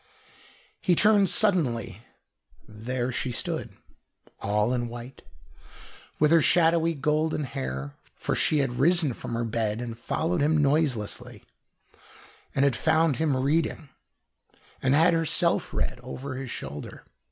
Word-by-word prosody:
He 180 - +2
turned 205 0 +4
suddenly. 130 - +3 0.7
There 120 +4 -4
she 125 +1 -3
stood, - - -4 0.6
all 105 +4 0
in 120 -1 -1
white, 120 +2 -10 1.0
with 150 0 +3
her 165 -1 +6
shadowy 165 +3 +3
golden 150 +2 0
hair 65 - -5 0.2
for - - -3
she 155 - +2
had 120 -1 -5
risen 160 -2 +3
from 115 - -6
her 115 - -1
bed 110 -2 -2
and 120 -1 -5
had 115 0 -9
followed 160 +7 -1
him 155 +2 +2
noiselessly, 140 -7 -1 1.1
and 140 - +3
had 140 - +2
found 160 -3 +2
him 155 -4 +1
reading, 150 +2 -1 0.9
and 130 +1 +2
had 165 +3 +4
herself 165 -2 +1
read - - -2
over 130 +2 -7
his 130 -1 -6
shoulder. 70 -8 -7
135 Hz, 130 wpm, -26 LUFS, 120-160 Hz, 1.1 s, her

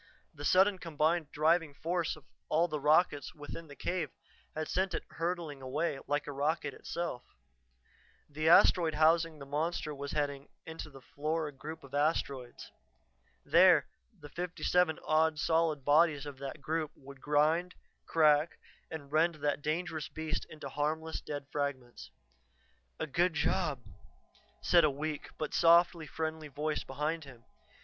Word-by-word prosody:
The 145 - -9
sudden 190 +2 +4
combined 160 -1 0
driving 155 0 +2
force 170 +2 -1
of 155 - -16 0.3
all 165 +3 +3
the 155 -3 -3
rockets 150 -1 +2
within 155 +2 -8
the 145 - -11
cave 175 -3 -2 0.5
had 155 0 -3
sent 190 -1 0
it - - -4
hurtling 165 -4 -3
away 135 +3 -2
like 145 +1 0
a - - -5
rocket 145 +1 -1
itself. 170 -8 -4 1.1
The 155 +2 0
asteroid 165 -1 +6
housing 160 +1 +3
the 140 - -9
monster 150 +2 -2
was 140 0 -6
heading 140 -2 -2 0.2
into 160 -1 -7
the 135 -2 -13
Flora 155 +1 -2
group 155 +4 -9
of 140 0 -14
Asteroids. 140 -4 -1 0.7
There - - +6 0.3
the 145 - -11
fifty 180 +3 -5
seven 180 -3 +3
odd 155 0 +3
solid 160 -3 +1
bodies 150 -1 +4
of 140 -2 -8
that 140 +2 -6
group 155 +1 -1
would 135 -1 -13
grind, 155 +4 +2 0.3
crack, 155 0 +3 0.3
and 145 -3 -8
rend 165 +2 +3
that 145 -1 -1
dangerous 160 0 -2
beast 155 +1 -4
into 155 -2 -8
harmless, 155 +3 -2
dead 145 -2 -6
fragments. 140 -4 -4 0.9
"A - - -1
good 170 +4 +1
job," 150 -4 0 0.8
said 170 -1 +5
a 155 - +5
weak, 150 +1 -4
but 155 - -4
softly 170 -1 +4
friendly 160 +1 -4
voice 150 +2 -2
behind 150 +4 -3
him. 125 -4 -14
155 Hz, 145 wpm, -32 LUFS, 145-165 Hz, 1.1 s, asteroid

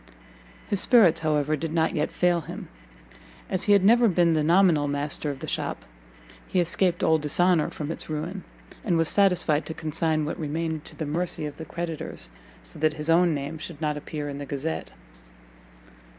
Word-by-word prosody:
His 200 - 0
spirits, 190 -10 +5
however, 155 -1 +1
did 160 +1 -4
not 160 0 +1
yet 150 0 -1
fail 175 -1 +1
him; - - -9 0.8
as 185 0 +1
he 205 - +5
had 200 -2 +4
never 235 +3 +6
been 175 -3 +3
the 155 - +2
nominal 170 -3 +4
master 145 +1 -2
of 140 -2 -6
the - - -6
shop, - - -3 0.6
he 185 - 0
escaped 175 0 +1
all 160 0 +4
dishonour 165 +2 +2
from 150 0 -5
its - - -5
ruin, 165 +5 -4 0.4
and 180 -7 +1
was 165 -1 +2
satisfied 180 -6 +2
to 160 - -5
consign 155 0 -1
what 155 - -4
remained 160 0 -3
to - - -8
the 155 - -4
mercy 160 +1 -1
of 150 - -7
the 160 - -7
creditors, 165 - -5 0.3
so - - -10
that 155 0 +2
his 155 +1 -1
own 170 -1 +4
name 145 +3 -5
should 155 -1 -8
not 150 -2 -1
appear 150 0 -5
in 140 0 -6
the 145 - -5
Gazette. 145 +4 -4
160 Hz, 185 wpm, -25 LUFS, 150-175 Hz, 0.8 s, never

